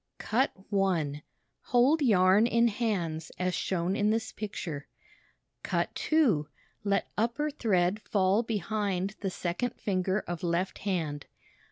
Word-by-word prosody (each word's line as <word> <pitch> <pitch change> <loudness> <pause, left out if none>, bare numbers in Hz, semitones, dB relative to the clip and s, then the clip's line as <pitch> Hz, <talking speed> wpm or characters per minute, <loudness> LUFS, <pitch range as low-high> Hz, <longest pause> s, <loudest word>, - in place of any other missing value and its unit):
Cut 260 +5 +1 0.2
1 170 -8 +1 0.4
Hold 260 +6 +4
yarn 200 -3 +5
in 235 0 +3
hands 180 -8 -2
as 180 0 0
shown 180 +1 -1
in 210 0 +2
this 225 +1 0
picture. 170 -8 -5 0.7
Cut - - -1
2 235 - +2 0.4
Let 200 -1 0
upper 260 +7 0
thread 200 -7 +1
fall 195 +1 +2
behind 205 -3 -2
the 195 - -2
second 185 +7 -2
finger 190 0 0
of 175 -2 -5
left 175 +2 -1
hand. 160 -7 -2
195 Hz, 125 wpm, -29 LUFS, 175-225 Hz, 0.7 s, yarn